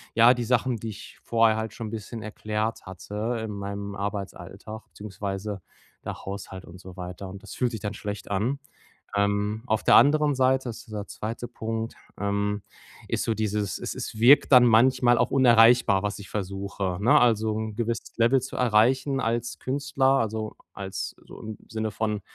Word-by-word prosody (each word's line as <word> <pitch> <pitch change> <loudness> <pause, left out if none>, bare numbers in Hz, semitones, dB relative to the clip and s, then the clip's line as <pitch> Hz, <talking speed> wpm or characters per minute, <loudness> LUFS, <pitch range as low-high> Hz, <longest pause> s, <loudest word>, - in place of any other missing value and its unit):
ja, 115 +2 +7
die 120 - -2
Sachen, 125 0 +1
die 110 +1 -6
ich 110 +1 -10
vorher 115 -1 +3
halt 110 0 -4
schon 115 -3 -6
bisschen 110 +1 -6
erklärt 110 +1 -3
hatte, 105 +5 -4
in 105 - -5
meinem 100 0 -5
Arbeitsalltag, 100 +1 -6
beziehungsweise 100 -1 -5 0.4
der - - -6
Haushalt 95 -1 -7
und 90 +1 -12
so 95 0 -11
weiter 90 +2 -7
und 95 +1 -9
das - - -9
fühlt 125 -1 0
sich 110 - -5
dann 105 0 -3
schlecht 105 -1 -6
an. 120 +8 0 0.6
Ähm, 100 +2 0
auf 110 -2 0
der - - +6
anderen 150 0 +5
Seite 130 0 +2
ist 115 - -10
dieser 105 -2 -6
2. 115 +2 -5
Punkt, 115 -1 -4 0.3
ähm 100 0 -1 0.5
ist - - -1
so 115 - +1
dieses, 105 -2 -1
es - - -4
es 110 - -6
wirkt 135 +4 +6
dann 125 -1 +9
manchmal 120 +1 +5
auch - - +2
unerreichbar, 120 -5 +5
was 105 0 -2
ich 100 - -10
versuche, 100 -2 -3
ne, 110 +4 +5
also 110 -2 +3
‘n 110 -1 -4
gewisses 115 0 -3
Level 120 +3 +4
zu 130 - -6
erreichen 130 +4 +3
als 120 +1 -2
Künstler, 140 0 -1
also 110 -1 -3 0.2
als 95 -1 -5
so - - -12
im 110 -1 -7
Sinne 110 -1 -3
von 105 -1 -1
110 Hz, 175 wpm, -26 LUFS, 100-120 Hz, 0.6 s, dann